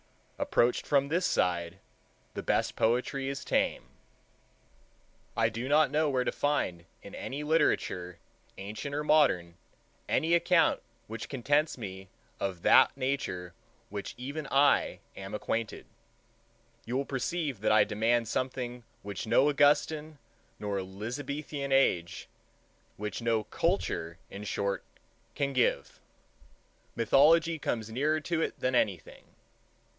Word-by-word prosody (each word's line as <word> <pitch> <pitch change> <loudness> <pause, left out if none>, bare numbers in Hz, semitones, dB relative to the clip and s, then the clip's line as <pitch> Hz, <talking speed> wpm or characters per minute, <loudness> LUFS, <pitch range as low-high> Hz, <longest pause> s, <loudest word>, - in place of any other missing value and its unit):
Approached 120 +1 +1
from 140 -1 +3
this 180 +3 +1
side, 85 0 0 0.6
the - - -4
best - - 0
poetry 125 +4 0
is 140 0 -5
tame. - - +1 1.5
I - - +3
do 125 +4 -5
not 150 -1 +4
know 155 +1 +2
where 130 -2 +1
to - - -1
find 90 - -1 0.2
in - - -11
any 140 +3 -5
literature, 120 - +1 0.4
ancient 105 +9 -5
or 150 - -1
modern, 130 - +3 0.5
any 165 +2 +2
account 170 -1 +3 0.2
which 115 +1 -7
contents 145 +4 +1
me 95 -4 -8 0.3
of 95 -3 -3
that - - +6
Nature 130 -10 -2 0.4
with 100 -1 -4
which - - -8
even 140 +4 -5
I 140 +1 +3
am 95 +2 -6
acquainted. 110 +1 -3 1.0
You 125 +3 -1
will 140 - -1
perceive 140 - -2
that 110 - +1
I 110 -1 +6
demand 115 +2 +1
something 125 0 -3 0.2
which 100 +1 -5
no 130 +6 +4
Augustan 150 +1 +2 0.4
nor 100 -2 -2
Elizabethan 135 +9 -5
age, 90 -11 +2 0.7
which 105 +2 -4
no 115 -2 +1
culture, 110 - -1
in 100 +1 -7
short, 100 0 -2 0.5
can 140 -1 -1
give. 125 -2 0 1.0
Mythology 155 +7 +4
comes 115 -5 -3
nearer 150 +6 +1
to 165 +1 -1
it - - -2
than 130 - 0
anything. 100 -8 -1
125 Hz, 125 wpm, -30 LUFS, 105-145 Hz, 1.5 s, that